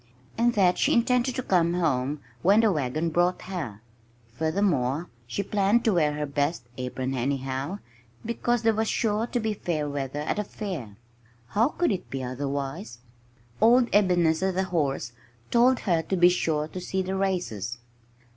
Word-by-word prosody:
and 235 Hz, +1 st, +2 dB
that 185 Hz, -3 st, +3 dB
she -, -, +3 dB
intended 250 Hz, +1 st, +2 dB
to 255 Hz, -, -2 dB
come 175 Hz, -4 st, +2 dB
home 145 Hz, -4 st, 0 dB, 0.2 s
when 200 Hz, +5 st, +5 dB
the 220 Hz, -2 st, +4 dB
wagon 155 Hz, +1 st, -1 dB
brought 175 Hz, +2 st, +1 dB
her. 150 Hz, -, -5 dB, 0.5 s
Furthermore, 160 Hz, -1 st, 0 dB, 0.2 s
she 200 Hz, -, -2 dB
planned 205 Hz, +3 st, +2 dB
to 220 Hz, -, +4 dB
wear 155 Hz, -4 st, +2 dB
her 150 Hz, 0 st, -2 dB
best 145 Hz, +1 st, -1 dB
apron, 130 Hz, +1 st, -3 dB
anyhow, 135 Hz, +5 st, -2 dB, 0.5 s
because 235 Hz, 0 st, 0 dB
there 225 Hz, 0 st, +4 dB
was 220 Hz, +1 st, 0 dB
sure 220 Hz, +1 st, 0 dB
to 245 Hz, -, -1 dB
be 220 Hz, -1 st, -1 dB
fair 160 Hz, -7 st, -2 dB
weather 140 Hz, 0 st, -3 dB
at 150 Hz, -, -2 dB
a -, -, 0 dB
fair! 165 Hz, -, -6 dB, 0.5 s
How 225 Hz, -, +3 dB
could 345 Hz, -1 st, 0 dB
it 190 Hz, -, -4 dB
be 135 Hz, -1 st, -4 dB
otherwise? 140 Hz, -, -4 dB, 0.6 s
Old 240 Hz, +2 st, +5 dB
Ebenezer, 180 Hz, -2 st, +3 dB
the 190 Hz, +1 st, 0 dB
horse, 145 Hz, -9 st, -1 dB, 0.4 s
told 245 Hz, +2 st, +4 dB
her 170 Hz, -5 st, +1 dB
to 185 Hz, +4 st, -2 dB
be 175 Hz, 0 st, +7 dB
sure 160 Hz, -4 st, 0 dB
to 185 Hz, -, -6 dB
see 190 Hz, +1 st, -2 dB
the 190 Hz, +1 st, -3 dB
races. 175 Hz, -, -2 dB
175 Hz, 165 wpm, -26 LUFS, 140-205 Hz, 0.6 s, be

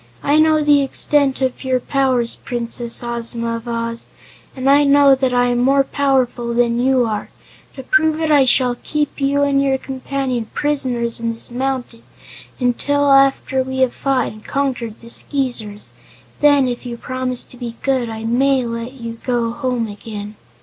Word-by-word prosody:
I 290 Hz, +2 st, +3 dB
know 310 Hz, -1 st, +3 dB
the 290 Hz, -1 st, +4 dB
extent 275 Hz, 0 st, +2 dB
of 260 Hz, +1 st, -2 dB
your 260 Hz, -1 st, +1 dB
powers, 255 Hz, -3 st, 0 dB
Princess 235 Hz, -1 st, -1 dB
Ozma 235 Hz, -1 st, -2 dB
of 230 Hz, +1 st, -11 dB
Oz, 230 Hz, 0 st, -3 dB, 0.5 s
and 260 Hz, 0 st, -3 dB
I 285 Hz, +1 st, +5 dB
know 280 Hz, -1 st, +5 dB
that 260 Hz, -1 st, +1 dB
I 245 Hz, 0 st, +2 dB
am 245 Hz, 0 st, 0 dB
more 275 Hz, +2 st, +3 dB
powerful 255 Hz, -4 st, 0 dB
than 235 Hz, 0 st, +1 dB
you 255 Hz, 0 st, +2 dB
are. 215 Hz, -2 st, -4 dB, 0.5 s
To 265 Hz, -, -8 dB
prove 310 Hz, +3 st, +2 dB
it 320 Hz, -1 st, 0 dB
I 285 Hz, -3 st, +5 dB
shall 250 Hz, -1 st, +2 dB
keep 295 Hz, -2 st, -2 dB
you 280 Hz, +1 st, +2 dB
and 280 Hz, -1 st, +2 dB
your 270 Hz, -1 st, +1 dB
companion 265 Hz, -3 st, -4 dB
prisoners 255 Hz, -6 st, 0 dB
in 230 Hz, 0 st, -2 dB
this 225 Hz, -, -3 dB
mountain 250 Hz, -2 st, -3 dB, 0.6 s
until 280 Hz, +3 st, +1 dB
after 275 Hz, -1 st, +3 dB
we 260 Hz, 0 st, -3 dB
have 255 Hz, -2 st, +2 dB
fought 270 Hz, -3 st, -1 dB
and 215 Hz, 0 st, -14 dB
conquered 250 Hz, -5 st, -3 dB
the 230 Hz, -, -12 dB
Skeezers. 240 Hz, -8 st, +1 dB, 0.5 s
Then, 285 Hz, -3 st, +4 dB
if 245 Hz, -1 st, -4 dB
you 240 Hz, -2 st, -6 dB
promise 255 Hz, 0 st, -2 dB
to -, -, -6 dB
be 240 Hz, -2 st, -7 dB
good, 260 Hz, -4 st, 0 dB
I 220 Hz, 0 st, -6 dB
may 255 Hz, +3 st, +1 dB
let 230 Hz, +2 st, -5 dB
you 230 Hz, -3 st, -8 dB
go 240 Hz, -2 st, -1 dB
home 250 Hz, -3 st, -2 dB
again." 210 Hz, 0 st, -8 dB
255 Hz, 170 wpm, -18 LUFS, 235-275 Hz, 0.6 s, I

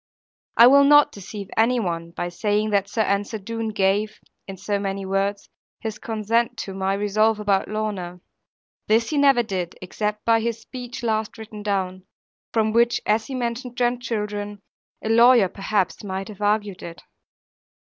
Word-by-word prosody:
I 235 Hz, -, +9 dB
will 280 Hz, +3 st, +7 dB
not 290 Hz, +1 st, +6 dB
deceive 200 Hz, 0 st, -9 dB
any 240 Hz, +2 st, +3 dB
one, 170 Hz, -5 st, -3 dB
by 175 Hz, +1 st, -4 dB
saying 210 Hz, +4 st, 0 dB
that 200 Hz, -1 st, +1 dB
Sir 220 Hz, +1 st, +1 dB
Ensor 200 Hz, +2 st, -1 dB
Doone 225 Hz, +2 st, -4 dB
gave 205 Hz, +1 st, 0 dB, 0.3 s
(in 195 Hz, -1 st, -7 dB
so 200 Hz, +2 st, -2 dB
many 195 Hz, 0 st, -3 dB
words) 195 Hz, +1 st, -1 dB, 0.3 s
his 220 Hz, -1 st, -5 dB
consent 225 Hz, +1 st, -1 dB
to 195 Hz, -, -7 dB
my 190 Hz, 0 st, -1 dB
resolve 215 Hz, +2 st, +1 dB
about 200 Hz, -2 st, +1 dB
Lorna. 200 Hz, -5 st, -4 dB, 0.7 s
This 225 Hz, +4 st, +2 dB
he 300 Hz, -, 0 dB
never 275 Hz, -4 st, +5 dB
did, 185 Hz, -5 st, -4 dB
except 210 Hz, +3 st, -4 dB
by 230 Hz, 0 st, +4 dB
his 230 Hz, 0 st, -2 dB
speech 245 Hz, +1 st, -8 dB
last 220 Hz, -1 st, -1 dB
written 215 Hz, -1 st, -9 dB
down; 190 Hz, -2 st, -2 dB, 0.4 s
from 220 Hz, -1 st, +1 dB
which 235 Hz, +1 st, +3 dB
as 215 Hz, +1 st, +1 dB
he 270 Hz, -, -5 dB
mentioned 245 Hz, 0 st, -4 dB
grandchildren, 210 Hz, -4 st, -2 dB, 0.4 s
a 220 Hz, -, -2 dB
lawyer 235 Hz, -2 st, +6 dB
perhaps 195 Hz, 0 st, -2 dB
might 190 Hz, 0 st, -4 dB
have 210 Hz, -1 st, -11 dB
argued 205 Hz, -2 st, 0 dB
it. 170 Hz, 0 st, -9 dB
210 Hz, 160 wpm, -23 LUFS, 195-230 Hz, 0.7 s, I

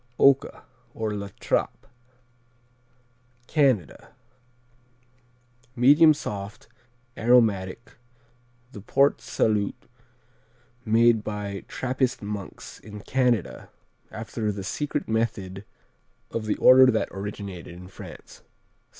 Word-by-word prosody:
Oka, 140 Hz, -1 st, +3 dB, 0.3 s
or 110 Hz, -1 st, -2 dB
La 100 Hz, -1 st, -5 dB
Trappe -, -, -1 dB, 1.6 s
Canada 130 Hz, -, 0 dB, 1.6 s
Medium 145 Hz, +6 st, +6 dB
soft; 100 Hz, -7 st, -7 dB, 0.5 s
aromatic; 115 Hz, -3 st, +2 dB, 0.8 s
the 100 Hz, -, -10 dB
Port 140 Hz, +7 st, +2 dB
Salut 105 Hz, -2 st, 0 dB, 1.1 s
made 115 Hz, 0 st, +3 dB
by 100 Hz, -2 st, -5 dB
Trappist 130 Hz, -1 st, -2 dB
monks 100 Hz, -1 st, -7 dB
in 105 Hz, -1 st, -10 dB
Canada 125 Hz, -4 st, -1 dB, 0.4 s
after 110 Hz, -1 st, -4 dB
the 100 Hz, -1 st, -6 dB
secret 145 Hz, +9 st, -3 dB
method 105 Hz, -4 st, -2 dB, 0.7 s
of 110 Hz, -1 st, -4 dB
the 105 Hz, -, 0 dB
order 130 Hz, 0 st, +7 dB
that 110 Hz, -3 st, +1 dB
originated 100 Hz, -3 st, -7 dB
in 90 Hz, +1 st, -11 dB
France. 95 Hz, -, -12 dB
110 Hz, 90 wpm, -25 LUFS, 100-125 Hz, 1.6 s, order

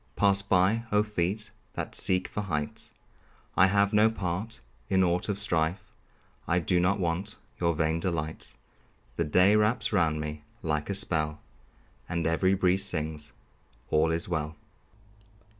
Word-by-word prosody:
Pass 100 Hz, -1 st, +4 dB
by, 100 Hz, +4 st, +2 dB
oh, 105 Hz, 0 st, +4 dB
feet 105 Hz, +1 st, -2 dB, 0.2 s
that -, -, -4 dB
seek 90 Hz, 0 st, +2 dB
for 105 Hz, -, -4 dB
heights! 75 Hz, -7 st, -4 dB, 0.6 s
I 95 Hz, -, +6 dB
have 100 Hz, +1 st, +2 dB
no 105 Hz, +1 st, +5 dB
part 105 Hz, +1 st, -4 dB, 0.3 s
in 95 Hz, -1 st, +3 dB
aught 90 Hz, +2 st, 0 dB
of 100 Hz, -, -1 dB
strife; 90 Hz, -3 st, -1 dB, 0.5 s
I 90 Hz, -, +2 dB
do 90 Hz, +1 st, +1 dB
not 90 Hz, +3 st, +2 dB
want 90 Hz, +4 st, -2 dB, 0.2 s
your 85 Hz, -2 st, +1 dB
vain 80 Hz, +1 st, 0 dB
delights. 80 Hz, -3 st, -3 dB, 0.6 s
The -, -, +1 dB
day 90 Hz, +7 st, +4 dB
wraps 105 Hz, +2 st, +1 dB
round 80 Hz, -5 st, +2 dB
me 75 Hz, 0 st, -5 dB, 0.2 s
like 75 Hz, 0 st, -1 dB
a 100 Hz, -, -1 dB
spell, 75 Hz, -6 st, 0 dB, 0.7 s
And 85 Hz, -2 st, -1 dB
every 95 Hz, +4 st, +2 dB
breeze 95 Hz, 0 st, +2 dB
sings, 75 Hz, -5 st, -3 dB, 0.6 s
"All 80 Hz, +1 st, +3 dB
is 80 Hz, +1 st, -1 dB
well." 80 Hz, -2 st, -2 dB
90 Hz, 145 wpm, -28 LUFS, 80-100 Hz, 0.7 s, I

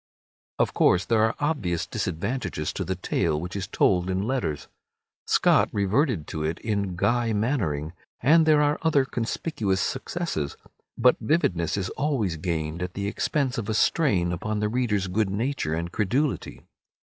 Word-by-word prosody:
Of -, -, +1 dB
course, 90 Hz, +1 st, +3 dB
there 115 Hz, -2 st, +2 dB
are 110 Hz, 0 st, +2 dB
obvious 105 Hz, -, -1 dB
disadvantages 100 Hz, -, -3 dB
to -, -, -3 dB
the 95 Hz, -, -2 dB
tale 85 Hz, -4 st, 0 dB
which 90 Hz, +4 st, -6 dB
is 95 Hz, -1 st, -3 dB
told 90 Hz, -1 st, +2 dB
in 95 Hz, +1 st, 0 dB
letters. 115 Hz, -, -2 dB, 0.6 s
Scott -, -, +4 dB
reverted 105 Hz, -, +1 dB
to 75 Hz, -, -3 dB
it 80 Hz, +2 st, -1 dB
in 100 Hz, -4 st, -1 dB
"Guy 120 Hz, +4 st, +1 dB
Mannering," 95 Hz, -, -1 dB, 0.3 s
and 160 Hz, +5 st, +5 dB
there 150 Hz, -1 st, +5 dB
are 145 Hz, +1 st, +1 dB
other 145 Hz, -4 st, +3 dB
conspicuous 115 Hz, -, -2 dB
successes, 100 Hz, -, -3 dB, 0.4 s
but 125 Hz, +1 st, +5 dB
vividness 90 Hz, -, +1 dB
is 95 Hz, -1 st, -2 dB
always 125 Hz, -, -1 dB
gained 80 Hz, -1 st, -3 dB
at 90 Hz, 0 st, -4 dB
the 100 Hz, -, -3 dB
expense 130 Hz, +5 st, -1 dB
of 110 Hz, -1 st, -5 dB
a 110 Hz, -, 0 dB
strain 100 Hz, -, +2 dB
upon 105 Hz, +5 st, -2 dB
the 105 Hz, 0 st, 0 dB
reader's 110 Hz, -5 st, 0 dB
good 95 Hz, +2 st, 0 dB
nature 100 Hz, -, -1 dB
and 85 Hz, +1 st, -3 dB
credulity. 125 Hz, +10 st, -1 dB
105 Hz, 160 wpm, -25 LUFS, 90-130 Hz, 0.6 s, and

